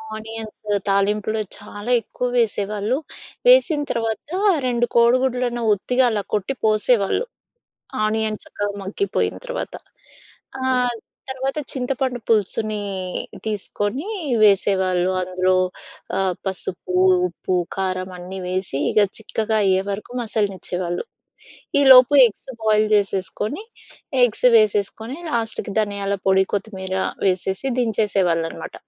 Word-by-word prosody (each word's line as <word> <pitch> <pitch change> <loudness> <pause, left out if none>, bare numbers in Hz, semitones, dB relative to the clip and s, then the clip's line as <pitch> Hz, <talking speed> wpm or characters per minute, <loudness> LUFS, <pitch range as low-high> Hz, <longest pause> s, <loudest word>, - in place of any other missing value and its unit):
Onions 220 0 -7 0.3
తాలింపులో 210 +2 +1 0.2
చాలా 205 +4 -6
ఎక్కువ 250 +4 -4
వేసేవాళ్ళు. 210 +1 0 0.5
వేసిన 435 -12 +5
తర్వాత 225 -1 -1 0.5
2 240 -1 +1
కోడిగుడ్లను 245 0 +2
ఉత్తిగా 250 +6 +1
అలా 205 -2 -1
కొట్టి 210 +5 0
పోసేవాళ్ళు. 215 - +2 0.8
ఆనియన్ 215 0 -1
చక్కగా 205 0 -4
మగ్గిపోయిన 305 - -1
తర్వాత. - - -4 0.9
ఆహ్, 250 -2 +1 0.3
తర్వాత, 265 +2 -3
చింతపండు 255 -1 -2
పులుసుని 215 0 +1 0.6
తీసుకొని 210 - -3 0.4
వేసేవాళ్ళు 190 -2 +3
అందులో. 185 0 +1 0.6
ఆహ్, 190 -2 +1
పసుపు, 185 -1 -3 0.3
ఉప్పు, 180 +1 -3 0.2
కారం 185 -1 -2
అన్నీ 185 +2 -7
వేసి 185 -6 -2
ఇగ 215 - +3 0.2
చిక్కగా 220 0 -1
అయ్యేవరకు 195 +4 0
మసలనిచ్చేవాళ్ళు. 190 - -2 0.8
ఈలోపు 265 0 +8
ఎగ్స్ 225 - -8
బాయిల్ 215 0 +3
జేసేసుకొని. 205 - 0 0.6
ఎగ్స్ 245 +1 +3
వేసేసుకొని. 215 +3 +2
లాస్ట్‌కి 225 -4 -2
ధనియాల 200 -2 -1
పొడి, 190 0 +5
కొత్తిమీర 190 -2 -3 0.3
వేసేసి 190 +4 0
దించేసేవాళ్ళనమాట. 195 -8 0
215 Hz, 95 wpm, -21 LUFS, 190-240 Hz, 0.9 s, ఈలోపు